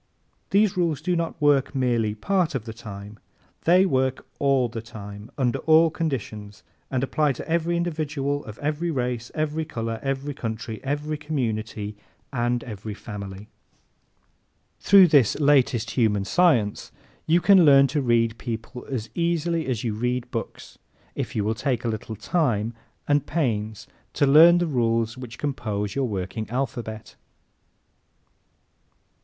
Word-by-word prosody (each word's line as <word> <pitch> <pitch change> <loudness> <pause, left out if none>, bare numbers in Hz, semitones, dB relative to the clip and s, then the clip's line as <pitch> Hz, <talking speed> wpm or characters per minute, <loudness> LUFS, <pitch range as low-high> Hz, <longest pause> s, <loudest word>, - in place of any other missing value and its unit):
These 200 0 +3
rules 170 -5 0
do 175 +3 -1
not 165 -1 -2
work 145 -2 +2
merely 120 -5 +1
part 175 - 0
of 120 -4 -3
the 115 - -6
time. 105 -2 -10 0.5
They 180 +3 +6
work 130 -6 0
all 135 -3 +3
the 115 -1 -6
time, 105 -2 -10
under 125 -4 0
all 160 +1 +5
conditions 110 - -4 0.3
and 130 -1 -1
apply 145 +1 +1
to - - -8
every 170 +1 0
individual 150 -4 -2
of 110 -1 -9
every 155 +4 -2
race, 125 -5 -2
every 155 +1 -1
color, 115 -7 -4
every 135 +1 -2
country, 110 -3 -5
every 145 +2 -2
community 110 -8 -3 0.4
and 120 -1 0
every 105 -2 -7
family. 100 -2 -8 1.3
Through 195 -3 +7
this 140 -6 +4
latest 140 -6 +3
human 105 -5 +1
science 125 - +2 0.4
you 165 +2 +4
can 190 0 +6
learn 140 -2 +7
to 145 -1 0
read 115 -2 +1
people 115 +1 -6
as 120 -5 -3
easily 170 -1 0
as 120 -5 -2
you 115 -3 -1
read 125 +2 -2
books 115 - -6 0.3
if - - -4
you 105 - +1
will 110 +2 0
take 120 0 -2
the 120 - 0
little 110 0 -5
time 115 - 0 0.3
and 145 -1 +2
pains 110 -9 -2 0.3
to - - +2
learn 160 +5 +8
the 175 - +1
rules 115 -5 0
which 125 -2 -9
compose 105 -8 -3
your 135 -2 0
working 100 +1 -4
alphabet. 115 -3 -4
125 Hz, 145 wpm, -24 LUFS, 110-150 Hz, 1.3 s, learn